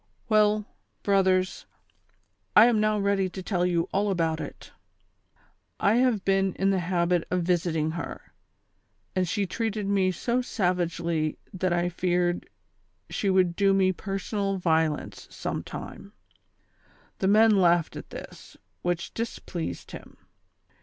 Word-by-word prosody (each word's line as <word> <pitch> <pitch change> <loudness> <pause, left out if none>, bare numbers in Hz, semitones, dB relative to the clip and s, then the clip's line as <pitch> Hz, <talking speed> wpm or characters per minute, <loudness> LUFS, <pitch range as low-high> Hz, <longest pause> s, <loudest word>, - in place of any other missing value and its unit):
" - - -39
Well, 210 -1 +3 0.4
brothers, 185 -2 +2 0.9
I 215 - +9
am 235 -3 +3
now 215 0 +2
ready 200 -2 +1
to 190 +1 -7
tell 180 -2 0
you 170 -1 0
all 205 +1 +1
about 165 -4 0
it. - - -9 1.1
I 210 +3 +3
have 245 -6 +2
been 195 -1 +2
in 195 +1 +2
the 190 - +1
habit 175 -1 +1
of 180 -1 0
visiting 165 -3 0
her, 165 +1 -7 0.8
and 185 -2 +1
she 205 +2 0
treated 215 +2 -2
me 195 -2 +2
so 240 +7 -1
savagely 170 -7 -1 0.2
that 185 -1 -1
I 175 0 +1
feared 175 0 0 0.6
slie 200 - 0
would 185 -2 +3
do 195 0 +3
me 190 -1 +3
personal 195 +1 -3
violence 160 -4 0
sometime - - -6 0.4
" - - -42
— - - -32
the 190 - +1
men 220 +3 +6
laughed 175 -4 +3
at - - -8
this, - - -11 0.3
whicli 175 -1 -2
dis 230 +1 -3
pleased 170 -3 -6
him. - - -11
185 Hz, 140 wpm, -27 LUFS, 175-200 Hz, 1.1 s, I